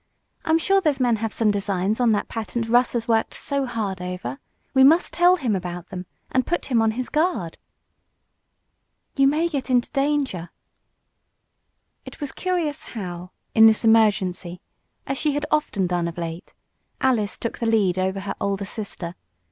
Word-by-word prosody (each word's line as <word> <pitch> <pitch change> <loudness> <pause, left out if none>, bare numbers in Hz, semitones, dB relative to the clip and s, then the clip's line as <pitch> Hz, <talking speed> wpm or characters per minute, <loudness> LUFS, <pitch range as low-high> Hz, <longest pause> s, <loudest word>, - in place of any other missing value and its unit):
I'm 320 0 +3
sure 390 +4 +3
those 300 -6 +1
men 240 -3 +2
have 225 0 -3
some 215 -2 +2
designs 200 +1 -1
on 240 -2 +4
that 205 - 0
patent 230 +1 -3
Russ 240 +2 +3
has 230 -1 -2
worked 225 -1 +1
so 280 -2 -2
hard 205 -6 -3
over. 180 -8 -5 0.3
We 265 -1 +6
must 320 +6 +5
tell 355 +1 +5
him 250 - -1
about 175 -1 -5
them, 180 -1 -7 0.2
and 260 - +2
put 345 -3 -3
him 235 -2 +4
on 225 - +3
his 255 - -2
guard." 305 - -1 1.6
"You 275 -1 +4
may 310 +4 +2
get 280 -6 -4
into 245 -1 +2
danger." 275 - -1 1.5
It - - -11
was 290 -3 -4
curious 345 -6 -2
how, 180 -3 -6 0.2
in 225 0 +8
this 220 +1 +3
emergency 200 -5 +2 0.5
as 275 -1 -3
she 300 -2 +1
had 290 - -1
often 300 -11 +1
done 175 -1 0
of 170 - -7
late 165 0 -6 0.4
Alice 230 -6 +1
took 230 - -4
the 230 - -1
lead 200 -5 +2
over 190 +1 -1
her 200 - -4
older 200 0 -1
sister. 195 -5 -5
225 Hz, 170 wpm, -23 LUFS, 190-275 Hz, 1.6 s, in